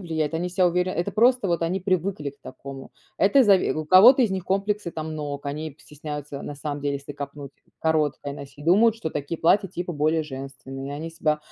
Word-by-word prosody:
влияют, 160 -3 -2
они 175 +2 -1
себя 180 +1 +2
уверя 180 +1 +1
Это 175 - -2
просто 245 0 +3
вот 170 -2 0
они 175 +3 0
привыкли 185 -5 -1
к 140 0 -26
такому. 135 +1 -9 0.3
Это 255 +8 +5
зави 200 -4 +4
у 155 - -3
кого-то 220 - +8
из 225 - +2
них 190 -2 -3
комплексы 200 0 -1
там 155 -1 -5
ног, 145 -2 -5
они 150 +1 -4
стесняются 150 -2 -7
на 145 - -7
самом 145 0 -4
деле, 140 0 -1
если 140 +1 -6
копнуть, 140 0 -8 0.3
короткое 150 -3 0
носить, 140 0 -11
думают, 210 +7 +5
что 160 -8 -4
такие 145 +3 -4
платья 195 +4 +3
типа 175 0 -5
более 155 +1 +1
женственные, 135 -1 -8
и - - -5
они 155 +3 -5
себя 155 -2 0
160 Hz, 205 wpm, -24 LUFS, 145-185 Hz, 0.3 s, кого-то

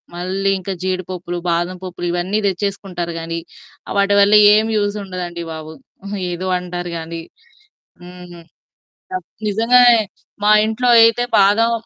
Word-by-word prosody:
మళ్ళీ 190 +3 -1
ఇంకా 190 +1 -5
జీడిపప్పులు, 185 -1 -4
బాదం 175 +2 -1
పప్పులు 180 -1 -6
ఇవన్నీ 180 +4 -1
తెచ్చేసుకుంటారు 190 -3 -3
గానీ 165 0 -4 0.6
వాటివల్ల 200 +1 +4 0.2
ఏమీ 220 +1 +2
యూజ్ 205 0 -1
ఉండదండి 175 -2 -6
బాబు. 155 0 -8 0.6
ఏదో 180 +2 -4
అంటారు 175 -1 -6
కానీ, 165 0 -6 0.8
హ్మ్. 180 -1 -12 0.7
అ - - 0 0.3
నిజంగానే 235 +3 +5 0.5
మా 210 - +5
ఇంట్లో 230 +3 -1
అయితే 230 +1 +4
బాదం 205 +4 +4
185 Hz, 115 wpm, -18 LUFS, 175-205 Hz, 0.8 s, నిజంగానే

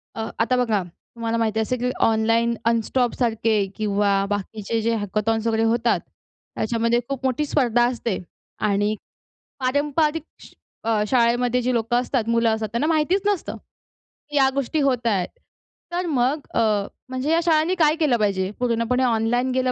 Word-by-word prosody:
अ, 225 0 -3
आता 245 +3 +2
बघा, 215 -5 0
तुम्हाला 230 +6 -5
माहिती 220 -1 0
असेल 245 +3 -1
की 250 - +1
ऑनलाईन 230 +1 +2
अनस्टॉपसारखे 230 -2 +1
किंवा 200 -2 +1
बाकीचे 210 +2 -3
जे 230 +1 +1
हॅकथॉन्स 215 +2 -1
वगैरे 225 0 +1
होतात, 230 +1 +2 0.6
त्याच्यामध्ये 230 +1 +1
खूप 270 -1 -4
मोठी 265 +3 0
स्पर्धा 245 -5 +2
असते 235 -5 -2 0.5
आणि 205 +2 +1 0.6
पारंपरिक 295 +4 +1 0.2
श - - -14 0.3
अ, 220 -2 +1
शाळेमध्ये 245 0 +2
जी 250 +1 0
लोकं 230 +1 0
असतात, 245 -3 -1
मुलं 230 0 +3
असतात, 220 0 -1
त्यांना 275 +6 0
माहितीच 330 +4 +2
नसतं, 410 -4 -1 0.7
की 295 - -7
या 265 -1 +5
गोष्टी 280 +3 -1
होत 250 -4 +1
आहेत. 195 -5 +1 0.6
तर 355 +1 -1
मग 275 +1 0
अ, - - +2 0.5
म्हणजे 260 +4 -2
या 330 - +4
शाळांनी 320 +2 +3
काय 310 -3 +3
केलं 300 -7 +2
पाहिजे, 195 -3 0
पूर्णपणे 245 +1 +1
ऑनलाईन 245 +2 +1
गेलं 255 0 +1
235 Hz, 150 wpm, -23 LUFS, 220-260 Hz, 0.7 s, या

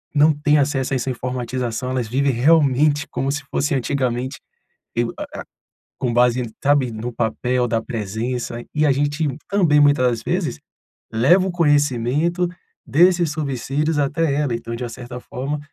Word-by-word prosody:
não 150 +2 +5
tem 150 +1 +2
acesso 135 -2 0
a - - +2
essa 130 +1 -2
informatização, 125 -1 -3
elas 125 -3 -1
vivem 135 +4 +1
realmente 145 +2 +3
como 135 - -2
se 145 +1 -3
fosse 145 +1 0
antigamente, 130 0 -1 0.6
e 115 - +1 0.2
a - - -4
a - - -10 0.7
com 120 -2 0
base, 125 +1 +3 0.2
sabe, 140 -4 +2
no 115 +2 -5
papel 125 +2 0
da 115 -1 0
presença. 115 +2 -4
E 150 0 +2
a 140 - +4
gente 145 +3 0 0.2
também, 170 -7 +3
muitas 145 -3 +4
das 120 -2 0
vezes, - - -2 0.5
leva 160 +12 +4
o - - -1
conhecimento 145 +1 +1 0.4
desses 170 +4 +4
subsídios 150 +1 -1
até 145 +2 +1
ela, 145 -4 0
então, 115 0 -5
de 125 - -4
uma - - -4
certa 125 +1 -8
forma 135 +4 -4
135 Hz, 160 wpm, -21 LUFS, 120-150 Hz, 0.7 s, não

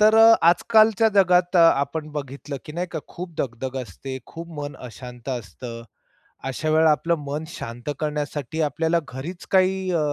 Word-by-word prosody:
तर 215 +1 +6
अ, 225 0 +9
आजकालच्या 220 +4 +5
जगात 180 -2 +4
अ, - - +7 0.2
आपण 155 +2 -3
बघितलं 140 0 -5
की 150 - -8
नाही 175 +3 -2
का 160 - -2
खूप 175 0 -7
दगदग 130 +1 -3
असते, 130 +5 -7
खूप 165 +1 -9
मन 145 -1 -5
अशांत 125 +1 -10
असतं. 115 0 -6 0.7
अशा 155 +4 -2
वेळेला 160 0 +5
आपलं 165 +3 +2
मन 145 +3 -3
शांत 120 -4 -6
करण्यासाठी 150 -1 -3
आपल्याला 160 +3 +1
घरीच 145 +8 -7
काही 190 0 +3
अ, 170 - +2
155 Hz, 160 wpm, -23 LUFS, 130-180 Hz, 0.7 s, अ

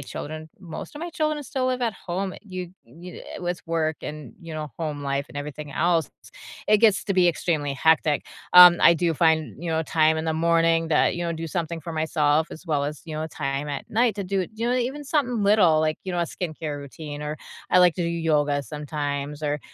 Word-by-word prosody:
children 155 +1 -7
Most 175 - -8
of 295 - -8
my 345 +1 -5
children 305 -2 -1
still 260 -1 -2
live 255 -1 -1
at 230 -2 +1
home, 190 0 -4
uh, - - -10
you 185 -4 -6
d - - -21
you 170 +9 -11
d - - -10
uh, - - -9
with 175 0 -2
work 160 -2 0
and, 150 -1 -7
you 165 -2 -8
know, 150 -1 -5
home 150 -3 -3
life 140 0 -2
and - - -11
everything 145 0 -6
else, 165 -2 +1 0.6
it 215 0 +6
gets 215 -3 +4
to 200 - -1
be 180 -1 +4
extremely 155 -4 0
hectic. 155 0 +2 0.3
Um, 180 -1 +10
I 170 - +7
do 170 0 +1
find, 160 -1 +1
you 170 -1 -3
know, 160 0 +1
time 160 0 +2
in 160 - -2
the 160 - 0
morning 165 0 +2
that, 155 +1 +2
you 175 - -3
know, 170 - -1
do 165 0 -5
something 170 0 -3
for 165 +2 -7
myself 155 -1 +1
as 160 - -11
well 150 -4 0
as, 150 +1 -5
you 160 - -6
know, 155 +1 -2
time 140 -2 -3
at 140 -1 -6
night 230 0 +2
to 200 - -4
do 195 +1 -1
it - - -7
you 230 +2 -2
know, - - +2
uh, - - +2
even 260 +4 -2
something 260 -6 0
little, 200 -6 +5
like, 155 0 0
you 185 - -4
know, 175 - 0
a - - +2
skincare 155 -4 -4
routine, 145 +1 -8
or 150 +1 -4 0.3
I - - +5
like 180 0 +7
to 180 - -2
do 170 - 0
yoga 150 -4 +1
sometimes 145 0 -4
or, 150 0 -1
165 Hz, 240 wpm, -24 LUFS, 150-180 Hz, 0.6 s, Um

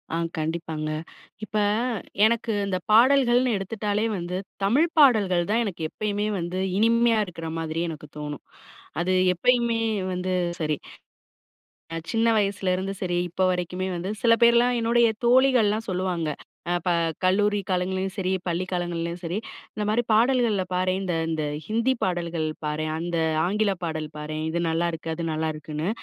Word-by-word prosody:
ஆ - - 0 0.2
கண்டிப்பாங்க. 160 -1 -3 0.5
இப்ப 215 0 -3 0.7
எனக்கு 230 +1 +1 0.2
இந்த 190 -2 0
பாடல்கள்ன்னு 245 0 +5
எடுத்துட்டாலே 205 +2 -2
வந்து, 175 +1 -3 0.3
தமிழ் 265 +12 +4
பாடல்கள் 200 - +4
தான் 235 +2 +2
எனக்கு 180 -5 -5
எப்பயுமே 210 0 -2
வந்து 175 +2 -3 0.2
இனிமையா 230 0 +4
இருக்கிற 165 -3 -7
மாதிரி 165 +1 -2
எனக்கு 155 -1 -8
தோனும். 150 -1 -6 0.6
அது 185 +2 +1 0.2
எப்பயுமே 235 +4 +2 0.3
வந்து 185 +1 -2 0.3
சரி. 155 -1 0 1.2
அ - - -3 0.2
சின்ன 230 0 +2
வயசுலேந்து 195 -1 0
சரி 175 -1 0
இப்ப 180 +2 -2
வரைக்குமே 180 +1 -2
வந்து 175 +2 -4
சில 230 - +5
பேர்லா 235 +1 +6
என்னுடைய 235 +1 +4 0.2
தோழிகள்லா 245 -4 +4
சொல்லுவாங்க 180 -3 -1 0.4
அ - - +2
இப்ப 180 - -1 0.3
கல்லூரி 205 +3 +3
காலங்கள்லயும் 185 +1 -1
சரி 190 -2 -1 0.2
பள்ளி 175 +1 -1
காலங்கள்லயும் 175 -1 -2
சரி 175 +4 -2 0.4
இந்த 210 - -3
மாரி 225 +3 +2
பாடல்கள்ல 230 -3 +3
பாரேன். 185 +1 +1
இந்த 180 -3 -1 0.2
இந்த 160 -1 -1 0.2
ஹிந்தி 230 +5 +1
பாடல்கள் 170 -3 -1 0.2
பாரேன் 155 +1 -2
அந்த 170 +1 -3 0.3
ஆங்கில 205 +3 +1
பாடல் 155 -2 -3
பாரேன் 155 +1 -4
இது 165 +2 -1
நல்லாயிருக்கு 165 0 -1
அது 170 +1 -4
நல்லாயிருக்குன்னு. 155 +1 -3
185 Hz, 140 wpm, -25 LUFS, 170-220 Hz, 1.2 s, பேர்லா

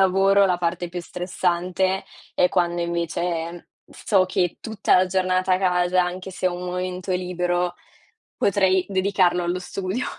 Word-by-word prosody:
lavoro, 195 +1 +4
la 180 -2 +1
parte 175 0 -2
più 175 +1 -5
stressante, 180 +1 -1 0.3
è 180 - +4
quando 175 -1 0
invece 170 0 -3 0.2
so 195 -3 +1
che 185 -2 -1
tutta 220 -3 +1
la 185 0 +4
giornata 185 0 +1
a 185 - +3
casa, 180 -1 +2
anche 180 +1 -4
se 185 0 -2
ho 175 - -4
un 180 - -6
momento 180 +1 -3
libero, 180 -1 -1 0.6
potrei 190 -2 +2
dedicarlo 190 -2 +2
allo 175 +1 -1
studio. 190 +6 -3
180 Hz, 145 wpm, -23 LUFS, 175-190 Hz, 0.6 s, lavoro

